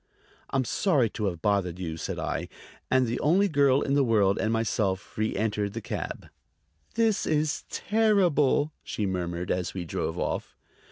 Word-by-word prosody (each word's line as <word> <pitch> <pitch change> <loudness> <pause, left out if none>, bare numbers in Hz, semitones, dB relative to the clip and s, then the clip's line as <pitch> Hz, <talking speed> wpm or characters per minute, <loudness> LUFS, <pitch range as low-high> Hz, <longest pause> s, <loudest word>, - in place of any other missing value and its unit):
"I'm 135 -1 0
sorry 135 - +2
to 105 - -3
have 85 -4 -3
bothered 95 -4 +1
you," 85 -3 -4
said 80 - -4
I; - - -2 0.4
and 130 -1 +4
the 120 +1 -2
only 185 +7 +3
girl 140 -5 +3
in 140 - 0
the 140 0 +4
world 105 -5 +3
and 110 - 0
myself 105 -4 -1
reëntered 105 -1 -1
the 115 - -3
cab. - - -5 0.7
"This 225 -2 +2
is 155 -1 0
terrible!" 180 -9 +2
she 105 - -3
murmured 90 -2 -2
as 90 0 -2
we 90 -2 -3
drove 80 - -3
off. - - -3
115 Hz, 160 wpm, -27 LUFS, 95-145 Hz, 0.7 s, and